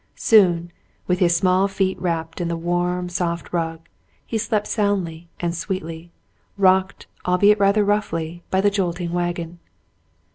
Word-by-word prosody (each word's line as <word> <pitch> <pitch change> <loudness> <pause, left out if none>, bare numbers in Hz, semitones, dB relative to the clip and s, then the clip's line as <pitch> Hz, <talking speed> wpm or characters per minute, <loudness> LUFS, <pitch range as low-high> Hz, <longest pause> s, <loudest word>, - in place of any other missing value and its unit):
Soon, 175 -6 +4 0.3
with 180 0 0
his 175 -2 +3
small 185 +2 +3
feet 195 -1 0
wrapped 165 -2 -2
in 175 - -1
the 170 0 -2
w^arm, 175 +1 -1
soft 170 -1 -3
rug, 165 -1 -3 0.4
he - - -5
slept 215 -1 0
soundly 180 -6 -1
and 170 -1 -1
sweetly, 170 -1 -5 0.5
rocked, 190 -1 +2 0.2
albeit 200 +4 +4
rather 200 +1 +3
roughly, 175 -5 -1
in 190 - +2
the 205 +1 +3
jolting 175 -3 -2
wagon. 175 -1 -3
175 Hz, 140 wpm, -22 LUFS, 170-195 Hz, 0.5 s, Soon